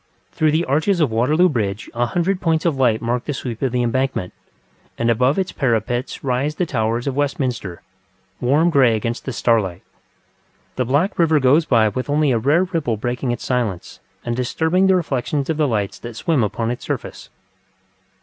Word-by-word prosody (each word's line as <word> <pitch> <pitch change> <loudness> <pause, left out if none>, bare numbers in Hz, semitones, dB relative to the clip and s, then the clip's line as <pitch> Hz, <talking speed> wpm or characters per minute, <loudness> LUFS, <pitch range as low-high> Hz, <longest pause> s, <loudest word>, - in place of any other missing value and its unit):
Through 155 - +1
the 160 +3 +1
arches 160 +7 +1
of 150 -7 +2
Waterloo 150 +11 +3
Bridge 105 - -2
a 120 +1 0
hundred 175 +7 -1
points 160 -2 +1
of 165 -4 +2
light 120 -5 +1
mark 120 +1 -1
the 145 - -3
sweep 120 -4 -6
of 135 - 0
the 125 0 0
Embankment, 125 -5 -1 0.6
and 115 0 +2
above 125 +5 +2
its 190 -1 -1
parapet 120 -1 -1
rise 135 +3 -1
the 180 - 0
towers 115 -4 -1
of 140 -2 -2
Westminster, 130 - -2 0.6
warm 150 +7 +2
grey 130 -6 +4
against 115 +2 -3
the 130 - -3
starlight. 105 -6 0 0.9
The 125 - 0
black 145 - 0
river 160 -3 +4
goes 140 +5 +4
by 115 -6 +3
with 130 +7 -5
only 145 -1 +2
a 115 - +2
rare 145 +9 +3
ripple 165 -11 -2
breaking 120 +3 -3
its 120 - -4
silence, 115 -8 -2 0.3
and 120 -1 -1
disturbing 160 +9 +1
the 190 - +4
reflections 145 -3 -1
of 155 - -3
the 150 -2 +2
lights 105 -5 -2
that 120 -1 -8
swim 140 +2 +1
upon 115 +2 -2
its 120 - -6
surface. - - -5
130 Hz, 185 wpm, -20 LUFS, 115-155 Hz, 0.9 s, grey